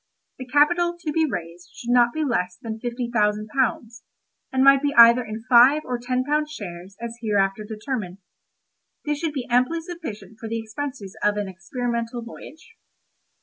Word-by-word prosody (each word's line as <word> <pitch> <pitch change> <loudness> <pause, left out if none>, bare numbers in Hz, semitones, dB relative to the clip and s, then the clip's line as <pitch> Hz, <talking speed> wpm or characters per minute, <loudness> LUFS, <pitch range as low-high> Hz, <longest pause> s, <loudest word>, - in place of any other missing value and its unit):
The 255 - -7
capital 345 +6 +3
to 320 -3 -3
be 320 +1 +2
raised 175 -4 -6
should 245 -2 -4
not 240 -1 +5
be 315 +3 -2
less 180 -10 -1
than 225 -1 -6
fifty 240 +1 -3
thousand 210 -1 +1
pounds, 235 -2 -1 0.5
and 260 0 +2
might 275 0 +7
be 285 0 -1
either 235 +1 +8
in 220 0 -7
five 260 +5 +6
or 250 -1 -3
ten 250 +1 -1
pound 300 +2 0
shares 190 - -9
as 235 0 -7
hereafter 205 -2 0
determined. 215 -3 -5 0.9
This 295 -1 -1
should 320 -2 -2
be 265 -4 -3
amply 255 +6 +2
sufficient 325 - -8
for 225 - -6
the 230 - -2
expenses 225 -2 -6
of 210 0 +2
an 205 -1 -2
experimental 235 +5 -4
voyage. 315 - -13
240 Hz, 170 wpm, -23 LUFS, 215-280 Hz, 0.9 s, either